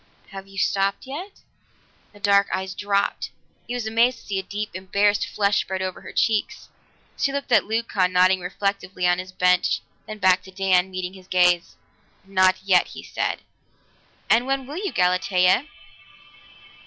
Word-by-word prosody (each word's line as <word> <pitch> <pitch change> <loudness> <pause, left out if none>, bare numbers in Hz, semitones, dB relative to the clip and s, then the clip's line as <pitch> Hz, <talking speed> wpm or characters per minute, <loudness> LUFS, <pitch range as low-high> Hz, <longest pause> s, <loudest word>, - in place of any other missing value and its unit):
"Have 195 -1 -9
you 195 0 -14
stopped 195 +2 0
yet?" 335 +10 -8 0.7
The 205 - -17
dark 200 0 +4
eyes 190 0 -3
dropped; 200 0 -1 0.4
he 245 - -3
was 245 -3 -3
amazed 230 +3 +2
to - - -17
see 195 -1 -2
a - - -2
deep, 205 +2 -5
embarrassed 200 +2 +1
flush 200 -1 +1
spread 190 0 -4
over 185 -1 -5
her - - -10
cheeks. 220 -2 0 0.5
She 275 - 0
looked 280 -2 -4
at 220 -5 +5
Leucon 210 -4 0
nodding 185 +1 +4
reflectively 190 0 -3
on 175 0 +3
his 185 0 -7
bench, 180 0 +2 0.3
then 215 - -7
back 185 -2 +3
to 190 - -12
Dan, 190 -1 +2
meeting 185 0 -5
his 185 -1 -15
gaze. 180 -2 +2 0.5
"Not 185 -1 +3
yet," 185 -2 +4
he - - -10
said. - - -3 0.8
"And 235 +3 +3
when 270 -1 -1
will 290 +5 -7
you, 395 0 -3
Galatea?" 180 +6 +2
195 Hz, 165 wpm, -23 LUFS, 185-215 Hz, 0.8 s, at